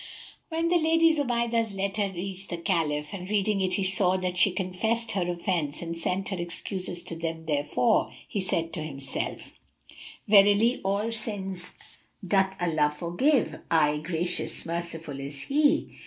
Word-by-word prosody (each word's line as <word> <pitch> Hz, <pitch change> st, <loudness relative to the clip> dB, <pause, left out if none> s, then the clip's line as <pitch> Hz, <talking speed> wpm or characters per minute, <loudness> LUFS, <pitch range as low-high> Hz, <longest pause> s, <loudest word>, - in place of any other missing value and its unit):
When 330 Hz, 0 st, 0 dB
the 350 Hz, 0 st, +4 dB
Lady 325 Hz, 0 st, +4 dB
Zubaydah's 235 Hz, -6 st, 0 dB
letter 200 Hz, +1 st, -1 dB
reached 190 Hz, +1 st, -6 dB
the 175 Hz, -, -3 dB
Caliph, 155 Hz, -4 st, -1 dB
and 185 Hz, -1 st, -6 dB
reading 205 Hz, -1 st, +1 dB
it 185 Hz, -1 st, +1 dB
he 195 Hz, -, 0 dB
saw 190 Hz, -1 st, +3 dB
that 180 Hz, -1 st, -2 dB
she 180 Hz, +2 st, +5 dB
confessed 220 Hz, +5 st, -1 dB
her 180 Hz, -4 st, -1 dB
offence 170 Hz, -4 st, -2 dB
and 170 Hz, 0 st, -4 dB
sent 185 Hz, +3 st, -1 dB
her 190 Hz, -3 st, -3 dB
excuses 175 Hz, +1 st, -4 dB
to 165 Hz, -, -6 dB
him 165 Hz, -1 st, -4 dB
therefor, 150 Hz, +9 st, +1 dB, 0.2 s
he 200 Hz, -, -2 dB
said 165 Hz, -3 st, -1 dB
to 170 Hz, -, -4 dB
himself, 140 Hz, -3 st, -5 dB, 0.7 s
"Verily, 205 Hz, +4 st, +5 dB
all 200 Hz, +4 st, 0 dB
sins 195 Hz, -5 st, -5 dB, 0.6 s
doth 190 Hz, 0 st, +2 dB
Allah 155 Hz, -4 st, +2 dB
forgive; 175 Hz, -, +1 dB
aye, 150 Hz, -2 st, +3 dB
Gracious, 170 Hz, +2 st, -2 dB
Merciful 165 Hz, -4 st, -4 dB
is 140 Hz, 0 st, -6 dB
He!" 295 Hz, -, +1 dB
185 Hz, 150 wpm, -27 LUFS, 170-210 Hz, 0.7 s, she